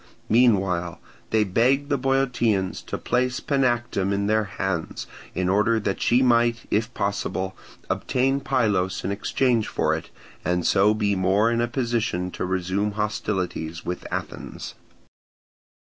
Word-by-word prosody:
Meanwhile 95 -8 +2 0.3
they 110 -1 +3
begged 130 +8 +2
the 140 - +2
Boeotians 125 -7 +1
to - - -3
place 125 0 0
Panactum 120 -8 0
in 100 0 0
her 110 0 +2
hands 95 -4 -3 0.3
in 90 +1 0
order 105 +4 +3
that 100 -2 -2
she 125 +2 +4
might, 120 -1 +3
if 110 +3 +1
possible, 95 -2 -2 0.3
obtain 135 +2 +1
Pylos 105 -9 0
in 95 - -1
exchange 115 +2 +1
for - - 0
it, - - -4 0.3
and 90 0 0
so 105 +2 +4
be 105 -2 +1
more 95 +4 +3
in 115 0 +1
a 120 - +1
position 115 -7 -1
to - - -3
resume 95 +3 -1
hostilities 95 -6 -3
with 90 0 -4
Athens. - - -6
105 Hz, 135 wpm, -24 LUFS, 95-120 Hz, 0.3 s, she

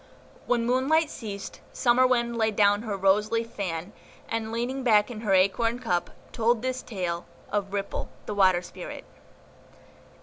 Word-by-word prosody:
When 240 -1 +2
Moonlight 280 +6 +2
ceased, 200 -4 -7
Summer 250 +1 +4
Wind 235 -2 +1
laid 220 -2 +1
down 205 0 +4
her 215 -3 -3
rose 195 +3 +3
leaf 230 0 -1
fan, 180 0 -4 0.3
and, 225 -1 -3
leaning 245 +4 -2
back 220 -2 +4
in 215 -2 -7
her 210 -4 +1
acorn 225 +5 +2
cup, 180 -9 -1 0.2
told 230 0 +1
this 255 0 -2
tale 175 -5 -4 0.2
of 200 -1 -1
RIPPLE, 200 0 -3 0.2
THE 210 - -4
WATER 185 -3 +4
SPIRIT. - - -8
220 Hz, 155 wpm, -27 LUFS, 200-240 Hz, 0.3 s, Summer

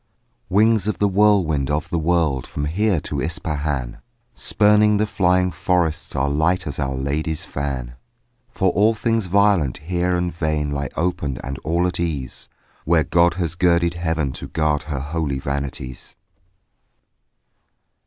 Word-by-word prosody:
Wings 110 +1 +3
of 105 - -1
the 105 - +2
whirlwind 95 -9 +2
of 75 +2 -1
the 85 - 0
world 80 -5 +1
From 75 - -4
here 95 +4 +1
to 70 -1 -3
Ispahan, 75 -7 -3 0.3
Spurning 105 0 +3
the 105 - +2
flying 90 -2 +2
forests 85 -1 -1
Are 65 +1 +1
light 80 +5 +1
as 75 - -5
Our 65 -2 -1
Lady's 75 +4 -2
fan: 65 -4 -4 0.6
For 95 -1 +1
all 110 +5 +3
things 115 -2 0
violent 100 -7 +3
here 90 +3 -1
and 90 0 -1
vain 75 -3 -1
Lie 70 -2 -2
open 75 -6 -1
and 70 0 -5
all 85 +3 0
at 90 -1 -2
ease 75 -7 -3 0.3
Where 80 0 +3
God 85 0 +3
has 85 -4 -1
girded 85 -1 +2
heaven 80 -5 -1
to - - -8
guard 75 -3 0
Her 70 -4 -2
holy 75 -1 -2
vanities. 70 -2 -5
80 Hz, 145 wpm, -21 LUFS, 70-90 Hz, 0.6 s, Wings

